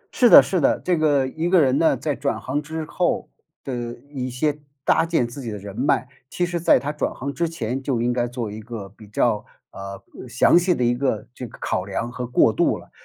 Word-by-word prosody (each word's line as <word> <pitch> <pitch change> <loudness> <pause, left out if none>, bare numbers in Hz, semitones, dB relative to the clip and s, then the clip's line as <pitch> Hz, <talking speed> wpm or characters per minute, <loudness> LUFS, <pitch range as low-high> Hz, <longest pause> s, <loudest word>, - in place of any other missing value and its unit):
是 245 - +5
的， - - +10
是 185 -4 -1
的。 - - +3
这 180 - 0
个， 145 -4 +2
一 160 +6 -2
个 185 -2 +5
人 135 -1 +3
呢， 165 - +3
在 150 -3 -2
转 140 +3 -2
行 145 +3 -2
之 160 +1 -5
后， 175 +3 -1 0.3
的 120 -3 -4 0.2
一 130 -2 -4
些 145 +4 -1 0.3
搭 165 - +3
建 160 -8 +1
自 120 +4 -9
己 120 - -5
的 105 - -5
人 100 0 -9
脉， 130 -1 +1 0.2
其 175 - -1
实 175 -1 -3
在 170 - +5
他 145 - -3
转 150 - -2
行 140 +2 -5
之 170 +2 -1
前 130 -4 -3
就 130 -3 -1
应 120 +1 +1
该 120 0 0
做 120 -3 -5
一 110 +1 -7
个 110 -3 -7
比 105 +2 -16
较， 105 +1 +1 0.3
呃， 100 0 -8 0.3
详 - - +4
细 180 0 +1
的 125 - -1
一 120 0 +3
个 120 -4 -1
这 125 -1 -7
个 - - -14
考 90 - -1
量 115 +5 -3
和 125 0 -5
过 125 - +3
渡 - - +2
了。 - - -15
130 Hz, 255 characters per minute, -22 LUFS, 120-155 Hz, 0.3 s, 的